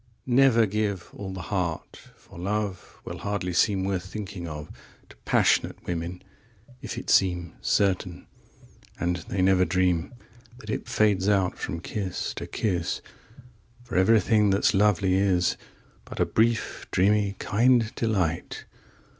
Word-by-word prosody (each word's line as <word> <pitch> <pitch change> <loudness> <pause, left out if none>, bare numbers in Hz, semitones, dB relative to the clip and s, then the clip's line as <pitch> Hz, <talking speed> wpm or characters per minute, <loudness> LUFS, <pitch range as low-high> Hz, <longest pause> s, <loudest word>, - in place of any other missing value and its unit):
1Never 125 -3 +5
give 100 -2 -2
all 100 -2 -6
the 95 -2 -6
heart, 90 -4 -2 0.2
for - - -15
love2Will 100 0 -4
hardly 100 -3 -3
seem 95 +1 +2
worth 95 -2 -1
thinking 100 -3 -6
of3To 75 -1 -11
passionate - - +2
women 90 +1 -4 0.6
if - - -6
it - - -6
seem4Certain, 90 0 +1 0.7
and 90 +1 0
they 95 -2 0
never 95 -1 +4
dream5That 105 +7 -3
it - - -3
fades 100 -2 +2
out 95 -3 +2
from 85 - -4
kiss 95 -1 -4
to - - -6
kiss;6For 115 +5 -6
everything 105 +2 +4
that's 95 +1 +3
lovely 100 -2 +3
is7But 95 -2 -2
a - - +4
brief, 115 0 0
dreamy, 100 +1 +2
kind 115 +1 +2
delight. 95 -8 -1
100 Hz, 115 wpm, -26 LUFS, 90-110 Hz, 0.7 s, 1Never